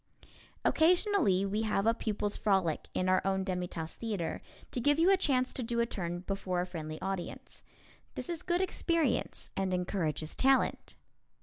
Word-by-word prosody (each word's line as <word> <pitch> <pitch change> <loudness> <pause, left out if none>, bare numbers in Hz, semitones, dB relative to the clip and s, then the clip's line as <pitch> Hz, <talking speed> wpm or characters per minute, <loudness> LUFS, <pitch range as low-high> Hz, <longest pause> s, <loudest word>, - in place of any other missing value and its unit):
Occasionally 335 - +3
we 205 +2 -1
have 215 -2 0
a 230 - +5
Pupils' 210 -2 -2
Frolic 190 -6 +1
in 185 - +1
our 185 0 +4
own 190 0 +1
Demi 180 -2 -2
Tasse 165 -2 -6
Theatre, 205 -8 -3 0.3
to 245 - -2
give 290 +4 +3
you 340 +4 +5
a - - +7
chance 260 -8 +1
to - - -3
do 235 0 -1
a 235 - +3
turn 175 -6 -4
before 190 -1 -2
a 180 - 0
friendly 155 -3 -6
audience. 190 -2 -5 0.5
This - - -5
is 340 -2 -4
good 350 0 0
experience 335 -7 0
and 190 -1 0
encourages 165 -4 -2
talent. 270 0 +2
200 Hz, 170 wpm, -31 LUFS, 180-260 Hz, 0.5 s, a